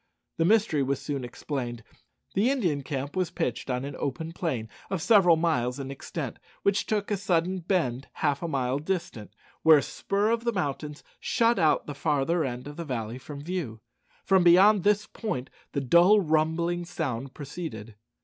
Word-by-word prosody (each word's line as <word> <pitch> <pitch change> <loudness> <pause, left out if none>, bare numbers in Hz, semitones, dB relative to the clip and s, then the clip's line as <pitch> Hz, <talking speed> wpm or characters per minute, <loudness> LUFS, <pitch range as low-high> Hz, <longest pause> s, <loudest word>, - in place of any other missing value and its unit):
The 165 - +2
mystery 205 -7 +3
was 135 0 0
soon 140 -3 -4
explained. 120 -1 -5 0.5
The 210 +6 +3
Indian 180 - 0
camp 140 +1 -4
was 185 -3 0
pitched 150 -9 -3
on 125 +1 -1
an 145 - -6
open 160 +4 -3
plain 135 -11 -2 0.2
of 190 - -1
several 180 -2 +5
miles 145 -7 0
in 135 0 -5
extent, 140 - -6 0.2
which 200 0 +1
took 210 -1 -1
a 205 - +1
sudden 185 -1 0
bend 160 -8 -1
half 145 -2 0
a 170 - -2
mile 135 -3 0
distant, 150 - -4 0.3
where 160 -1 +8
a 140 - +1
spur 205 +2 -1
of 230 0 0
the 235 -1 0
mountains 150 -4 -3 0.2
shut 235 -2 +2
out 155 -3 +3
the 145 - -5
farther 145 +4 +1
end 125 -2 -4
of 145 - -9
the 170 - -4
valley 120 -3 -4
from 145 +2 -9
view. 160 -10 -4 0.5
From 190 -2 +4
beyond 190 +4 +6
this 210 +1 +3
point 130 - -5 0.2
the 140 - 0
dull 175 - +6
rumbling 170 +1 +1
sound 135 -6 -4
proceeded. 140 -7 -7
160 Hz, 175 wpm, -27 LUFS, 135-185 Hz, 0.5 s, where